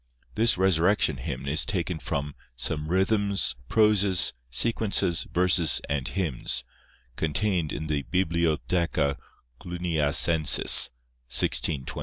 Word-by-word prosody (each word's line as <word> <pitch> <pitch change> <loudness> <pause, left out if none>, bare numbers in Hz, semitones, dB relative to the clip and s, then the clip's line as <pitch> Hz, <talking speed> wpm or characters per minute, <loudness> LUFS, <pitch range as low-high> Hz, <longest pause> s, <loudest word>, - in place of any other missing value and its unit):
This 115 -1 +2
Resurrection 90 -4 +1
hymn 65 +2 -7
is 75 +3 +1
taken 90 -4 -3
from 70 -1 -5 0.2
"Some 75 +5 -3
Rhythms, 95 - 0
Proses, 105 -4 +2 0.2
Sequences, 100 - 0
Verses, 90 -2 +2
and 70 -3 -3
Hymns," 85 -11 -3 0.5
contained 85 - -2
in 80 - -6
the 75 -2 -2
Bibliotheca 85 -3 -1 0.4
Cluniacencis, 80 -3 +4 0.4
1623. 65 +1 0
85 Hz, 95 wpm, -25 LUFS, 75-95 Hz, 0.5 s, Cluniacencis